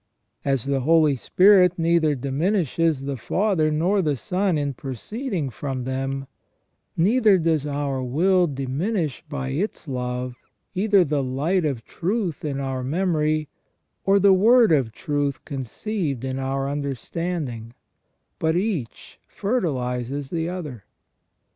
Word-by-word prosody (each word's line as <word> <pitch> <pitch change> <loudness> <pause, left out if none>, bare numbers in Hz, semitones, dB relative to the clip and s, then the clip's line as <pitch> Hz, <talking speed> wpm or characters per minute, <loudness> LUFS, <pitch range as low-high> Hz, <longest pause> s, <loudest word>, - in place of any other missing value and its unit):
As 135 -2 0
the 140 -1 0
Holy 155 +1 +4
Spirit 185 - +5
neither 165 -2 +2
diminishes 155 - 0
the 140 -1 -3
Father 180 - +1
nor 175 +7 +2
the 150 -5 +1
Son 180 - 0
in 145 -1 -1
proceeding 155 - -4
from 130 +1 -4
them, 135 +1 -3 0.7
neither 210 +3 +4
does 160 -4 +1
our 140 -2 -2
will 175 +8 +2
diminish 145 - -2
by 135 -2 -3
its 165 +5 -3
love 125 -1 -3 0.4
either 200 0 +4
the 145 -1 0
light 150 +8 0
of 130 -6 -2
truth 185 - -2
in 140 -3 -2
our 135 -2 -3
memory, 155 0 0 0.6
or 195 +1 +4
the 200 0 +6
word 225 +3 +5
of 135 -7 +2
truth 145 +2 -2
conceived 140 - -3
in 130 0 -3
our 135 +1 -1
understanding, 140 -3 -4 0.6
but 160 0 +1
each 180 - -3
fertilizes 135 - -2
the 165 0 -1
other. 150 - -6
150 Hz, 125 wpm, -23 LUFS, 135-180 Hz, 0.7 s, the